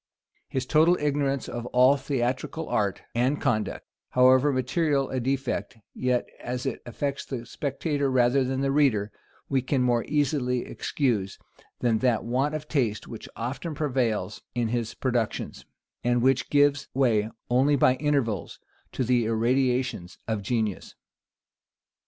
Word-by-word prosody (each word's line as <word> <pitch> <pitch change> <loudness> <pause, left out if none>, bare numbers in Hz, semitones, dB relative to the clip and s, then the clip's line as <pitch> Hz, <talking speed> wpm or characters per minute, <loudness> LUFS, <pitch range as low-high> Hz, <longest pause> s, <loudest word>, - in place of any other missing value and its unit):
His 130 -1 -2
total 160 +6 +4
ignorance 140 -2 0
of 120 0 -5
all 125 +3 +5
theatrical 135 +3 -2
art 100 -3 -1
and 130 +5 +1
conduct, 110 -6 -1 0.2
however 130 +3 +5
material 135 +2 0
a 130 - -1
defect, 130 -1 -2 0.2
yet, 125 -1 0 0.2
as 125 +1 -3
it 135 - -3
affects 140 +3 -3
the 120 -3 -6
spectator 140 +3 -2
rather 130 +1 +3
than 130 +1 -1
the 135 0 +1
reader, 120 -8 +2 0.4
we 135 -2 +1
can 130 0 0
more 120 -2 +2
easily 140 -4 0
excuse, 110 -9 -1 0.4
than 115 -3 +2
that 125 -3 +2
want 135 +6 0
of 155 0 -5
taste 120 -9 -1
which 115 - -9
often 140 +7 -4
prevails 125 -8 -1
in 120 -2 0
his 115 -1 -2
productions, 120 -4 -2 0.4
and 120 0 +2
which 135 0 +2
gives 145 0 +3
way 115 -5 +2 0.2
only 135 +4 +4
by 130 -2 +4
intervals 135 - -1 0.4
to 130 - -1
the 120 -1 +2
irradiations 125 -3 0
of 110 -2 -1
genius. 110 -1 -2
130 Hz, 140 wpm, -26 LUFS, 120-140 Hz, 0.4 s, all